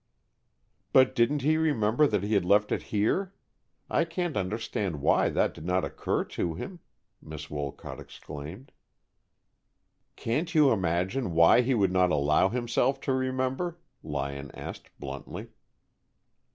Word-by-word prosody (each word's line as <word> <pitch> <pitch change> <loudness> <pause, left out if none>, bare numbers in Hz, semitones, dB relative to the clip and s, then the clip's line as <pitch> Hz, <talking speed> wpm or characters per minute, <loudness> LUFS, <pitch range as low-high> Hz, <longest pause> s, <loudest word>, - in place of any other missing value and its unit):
"But 130 0 +6
didn't 130 +3 +2
he 155 +2 +3
remember 145 -3 +3
that 105 -6 0
he 105 +2 -1
had 100 -3 +3
left 105 +3 +3
it - - 0
here? 180 - 0 0.5
I - - +2
can't 170 -1 -3
understand 100 -4 -2
why - - +3
that - - +1
did - - -11
not 90 +2 +1
occur - - -1
to 85 -2 -3
him," 180 - -7 0.4
Miss 75 0 -9
Wolcott 75 -2 -5
exclaimed. 80 - -9 1.4
"Can't 160 +9 -2
you 150 -4 +6
imagine 95 +3 0
why 85 +8 +6
he 125 +1 +1
would 100 -4 +2
not 90 -1 +3
allow 75 +4 +3
himself 125 +3 0
to 135 - 0
remember?" 130 +6 -1 0.2
Lyon 70 -2 -4
asked, - - -8
bluntly. 70 0 -7
105 Hz, 135 wpm, -28 LUFS, 85-135 Hz, 1.4 s, But